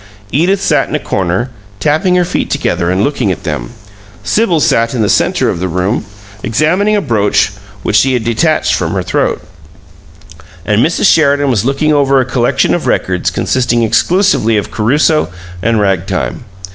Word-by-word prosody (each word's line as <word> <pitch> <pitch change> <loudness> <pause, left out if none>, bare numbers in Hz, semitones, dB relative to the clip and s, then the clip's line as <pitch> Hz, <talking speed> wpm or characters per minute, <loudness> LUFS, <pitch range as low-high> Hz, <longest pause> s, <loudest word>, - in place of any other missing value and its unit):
Edith 180 +7 +1
sat - - +1
in - - -2
a - - 0
corner, 95 +7 -2 0.3
tapping 160 +5 +1
her 180 -1 +2
feet 175 - -2
together 85 -1 -1
and 95 +2 +1
looking 125 -6 0
at 95 - -5
them; 75 -5 -4 0.5
Sibyl 200 -7 +1
sat 115 -2 +1
in 115 - 0
the - - +1
center - - +1
of - - -1
the 95 - -2
room, 90 +6 -1 0.4
examining 170 - +1
a 205 - +1
brooch 105 - +1 0.3
which - - +1
she 135 0 +3
had 125 -3 -1
detached 120 +8 +1
from - - -1
her - - -1
throat; - - -1 1.2
and 105 +3 +2
Mrs. 165 - 0
Sheridan 145 -3 +3
was 115 -3 0
looking 140 +3 +1
over 140 -2 +3
a 130 - +1
collection 120 -1 +1
of - - -2
records 90 -1 0
consisting 120 -2 0
exclusively 115 - +2
of 105 - -3
Caruso 145 - +1 0.3
and 115 +2 +1
rag 95 -4 0
time. - - -3
125 Hz, 170 wpm, -13 LUFS, 105-155 Hz, 1.2 s, she